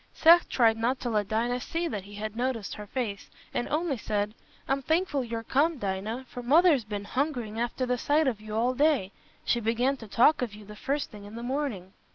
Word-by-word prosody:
Seth 340 +2 +6
tried 225 -3 +4
not 240 +4 0
to 240 - -2
let 210 -2 +1
Dinah 235 +4 0
see 335 +6 -2
that 205 - -4
he 205 +1 -11
had 215 +1 -5
noticed 240 -3 -2
her 210 0 -8
face, 215 -4 -4 0.2
and 240 - -2
only 305 -2 0
said, 210 0 -2 0.3
"I'm 270 0 +1
thankful 315 -1 +1
you're 230 -1 -4
come, 300 +7 +2
Dinah, 205 +4 -3
for 245 - -7
Mother's 295 +1 +5
been 205 -1 -5
hungering 245 -4 -2
after 240 +2 -1
the 250 -1 0
sight 300 +5 +2
of 225 -5 -1
you 215 0 -6
all 240 +3 +2
day. 275 -8 +2 0.3
She 240 - +2
began 240 +5 +1
to 225 - -10
talk 250 +8 +4
of 230 -5 -3
you 210 0 -12
the 210 +1 -10
first 285 +5 -2
thing 205 -1 -11
in 205 +2 -10
the 235 - -6
morning." 245 -8 -3
240 Hz, 215 wpm, -28 LUFS, 215-275 Hz, 0.3 s, Seth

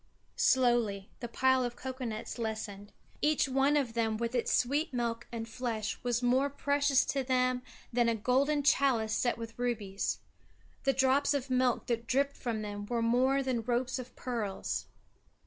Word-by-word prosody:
Slowly 240 -6 +2
the 240 - -4
pile 260 +2 +2
of 245 -1 -3
cocoa 260 0 -5
nuts 220 +1 -5
lessened. 215 -2 -4 0.3
Each 300 -1 +3
one 270 +2 +3
of 255 -6 0
them 225 -2 0
with 235 +1 -2
its 245 -2 0
sweet 290 +6 +1
milk 235 -1 -2
and 230 -1 -4
flesh 225 -2 -3
was 245 0 -1
more 260 +3 +3
precious 285 -1 +2
to 275 -1 -1
them 255 -1 +1 0.3
than 240 -1 +3
a 230 - +1
golden 275 +6 +2
chalice 255 -6 +3
set 240 +1 +1
with 230 0 -8
rubies. 215 -5 -1 0.7
The 270 - +4
drops 270 +2 +3
of 270 -1 -3
milk 255 -1 +2
that 235 -1 -2
dripped 280 +3 +1
from 225 -4 -3
them 205 0 -5
were 235 0 0
more 260 +4 +3
than 255 -3 0
ropes 250 +3 -1
of 255 0 -9
pearls. 225 -6 -3
245 Hz, 165 wpm, -31 LUFS, 230-265 Hz, 0.7 s, The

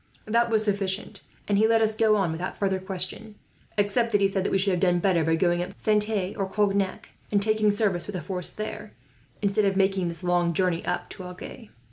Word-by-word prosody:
That 235 +2 +2
was 220 -1 +2
sufficient, 200 -1 -2 0.3
and 200 -1 +2
he 220 - +5
let 225 0 +4
us 220 -1 +2
go 220 -1 +4
on 195 -5 +1
without 175 +3 -4
further 195 -2 0
question; 190 +3 -6 0.4
except 220 +3 +1
that 205 - +3
he 200 - +4
said 195 -1 -1
that - - 0
we - - +2
should 195 +1 +1
have 180 - 0
done 180 -1 +3
better 175 -2 +2
by 160 +1 +2
going 175 +1 +1
up 180 - -6
to - - -23
Saintes, 210 -2 0
or 195 -1 -2
Cognac, 200 -1 0 0.2
and 205 - +3
taking 215 +1 +2
service 205 -4 +1
with 205 - -5
the 180 - -3
force 180 -3 -1
there, 215 0 -6 0.5
instead 200 +1 +2
of 195 -1 +1
making 190 -2 +2
this 170 +2 -3
long 175 -1 +1
journey 180 -2 +1
up - - -3
to 185 - -8
Agen." 180 +4 -10
195 Hz, 225 wpm, -26 LUFS, 180-210 Hz, 0.5 s, he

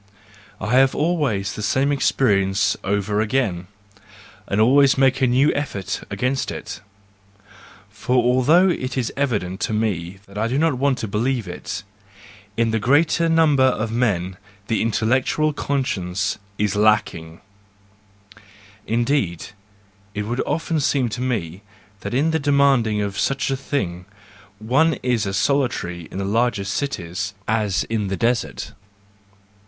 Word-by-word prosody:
—I 105 +3 -3
have 135 0 +4
always 145 - 0
the - - -6
same 135 +6 +1
experience 100 -8 +2
over 100 +1 0
again, 105 -7 -1 0.8
and 100 - -1
always 135 +5 +5
make 135 0 +3
a 130 - +4
new 130 +4 +3
effort 130 -10 -3
against 130 +1 -1
it; 105 -2 -7 1.1
for 100 +5 -3
although 130 +9 +4
it 130 -6 -2
is 120 -3 -1
evident 105 -10 -1
to - - -2
me 100 -4 -2
I 105 +3 -2
do 125 +3 -1
not 155 -4 +1
want 140 -1 +2
to 110 - -4
believe 115 +2 -1
it: 90 +1 -6 0.7
in 115 -1 +2
the 110 - 0
greater 160 +7 +3
number 160 -4 +4
of 115 -3 0
men 95 -6 0 0.3
the 110 +1 0
intellectual 130 +7 +1
conscience 100 -10 -2 0.2
is 105 -2 0
lacking; 105 -6 +1 1.5
indeed, 115 - 0 0.7
it 105 - -2
would 120 +4 -2
often 165 -1 -1
seem 135 -3 +1
to 120 +3 -5
me 100 -8 -2 0.4
that 105 - -5
in 150 +5 +2
demanding 140 -8 +2
such 135 +7 -1
a - - +1
thing, 95 -10 -3 0.5
one 135 +9 +2
is 120 -5 0
as 95 0 -2
solitary 95 - -1
in - - -8
the 100 - -2
largest 105 -2 0
cities 100 -7 -3
as 105 -3 +1
in 110 -3 -2
the 95 0 -2
desert. 120 0 -1
115 Hz, 135 wpm, -21 LUFS, 100-135 Hz, 1.5 s, always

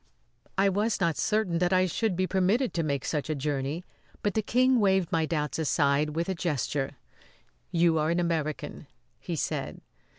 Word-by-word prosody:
I 195 +1 +4
was 205 +4 +1
not 170 -4 +1
certain 210 -6 0
that 180 +1 +1
I 185 0 +4
should 195 +2 0
be 185 +1 +1
permitted 195 +7 +1
to 170 - 0
make 140 -4 -1
such 150 -1 -2
a 155 - 0
journey, 145 +4 -2 0.4
but 205 - +1
the 220 - +1
King 255 +3 +3
waved 190 -4 +2
my 160 -1 +1
doubts 150 -1 -2
aside 150 -1 +1
with 170 +1 -1
a 190 - 0
gesture. 145 -5 -2 0.7
"You 165 -2 +3
are 155 +1 +1
an 170 +1 +1
American," 155 -3 -2 0.3
he 175 - -4
said. 150 - -3
170 Hz, 175 wpm, -28 LUFS, 150-190 Hz, 0.7 s, I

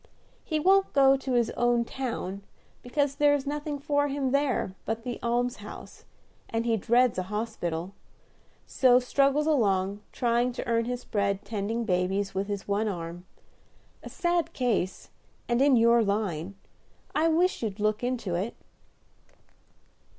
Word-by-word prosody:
He 310 -2 -1
won't 385 +4 +3
go 270 -1 +6
to 270 -1 -3
his 240 -2 +2
own 240 -1 +1
town, 230 -7 -4 0.4
because 280 +3 0
there 290 0 +4
is 280 -1 -3
nothing 295 +1 -3
for 285 0 0
him 275 -2 -1
there 280 -8 0
but 225 +1 -3
the 245 -1 -5
almshouse, 245 +2 -3 0.4
and 225 +1 -1
he 230 -1 +2
dreads 235 +1 +2
a 185 0 -5
hospital; 195 -5 -3 0.7
so 250 -2 +4
struggles 275 +3 +2
along, 200 -9 +1
trying 240 +1 +1
to - - -5
earn 230 -1 +1
his 245 +1 -4
bread 200 -1 -1
tending 220 +2 -2
babies 190 +1 0
with 195 +1 -2
his 200 -2 -4
one 205 +2 0
arm. 175 -2 -5 0.7
A - - -9
sad 345 -2 0
case, 220 -7 -1 0.4
and 240 +1 +1
in 280 -1 +5
your 235 0 +5
line; 200 -4 -2 0.6
I 315 +2 +2
wish 345 +3 +2
you'd 210 -3 -3
look 215 +2 0
into 245 -7 -2
it." 190 +7 -2
235 Hz, 145 wpm, -27 LUFS, 200-270 Hz, 0.7 s, go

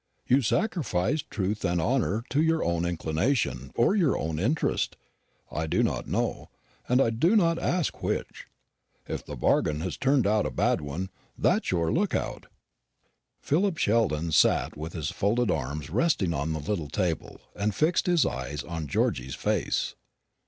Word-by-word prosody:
You 130 +3 +4
sacrificed 140 - 0
truth 105 +1 -2
and 90 -2 +1
honour 115 +3 +1
to 145 - +3
your 160 0 +2
own 85 0 0
inclination, 80 - -1
or 120 - +3
your 170 -9 +3
own 80 0 -2
interest, 135 - 0 0.5
I 80 +1 -2
do - - +2
not - - -1
know, - - -2 0.4
and 120 -3 +2
do 175 - +4
not 170 -5 +3
ask 175 -4 -1
which. - - -3 0.6
If - - -4
the - - -7
bargain 75 0 +1
has 90 +1 -3
turned 135 -3 +2
out 105 -3 +2
a - - -2
bad 65 - +1
one, 80 +7 -5 0.3
that's - - +2
your 85 -3 +1
look - - +1
out." - - -3 0.9
Philip 175 +3 +1
Sheldon 100 - +1
sat - - +3
with 80 +2 -6
his 75 -4 -3
folded 110 +1 +1
arms 75 +1 -3
resting 105 - +1
on 75 +2 -1
the 80 - -3
little 80 -1 -3
table 90 -3 -2 0.2
and 105 +1 0
his 170 - +2
eyes 65 +3 -3
fixed - - -11
on 80 -3 -4
Georgy's 65 -1 0
face. - - -1
100 Hz, 160 wpm, -27 LUFS, -, 0.9 s, You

